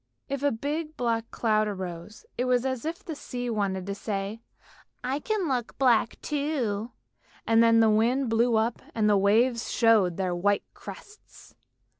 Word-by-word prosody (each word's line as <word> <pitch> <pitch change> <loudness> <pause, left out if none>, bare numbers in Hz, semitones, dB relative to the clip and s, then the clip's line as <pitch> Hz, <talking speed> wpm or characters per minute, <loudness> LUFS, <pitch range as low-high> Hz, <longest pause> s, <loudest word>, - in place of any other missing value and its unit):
If 275 -1 -3
a 285 0 +2
big 300 +6 -4
black 230 -2 -1
cloud 215 -2 +1
arose, 185 0 -6
it 250 - -1
was 250 -1 +2
just 265 - 0
as 260 0 -5
if 330 +2 -5
the 325 - -4
sea 245 -4 -5
wanted 195 -4 -1
to 200 - -3
say, 200 +1 -4 0.3
" - - -24 0.3
I 260 +3 -1
can 415 +1 -1
look 250 -4 -2
black 240 -3 +2
too," 270 -8 -1 0.6
and 225 0 +4
then 230 0 +5
the 220 - +5
wind 240 +5 +2
blew 230 +1 +2
up 220 +1 0
and 215 -2 +2
the 210 - +4
waves 230 +5 +2
showed 215 -7 +3
their 185 -2 -1
white 200 +3 +1
crests. 420 +1 -13
230 Hz, 175 wpm, -27 LUFS, 210-260 Hz, 0.6 s, then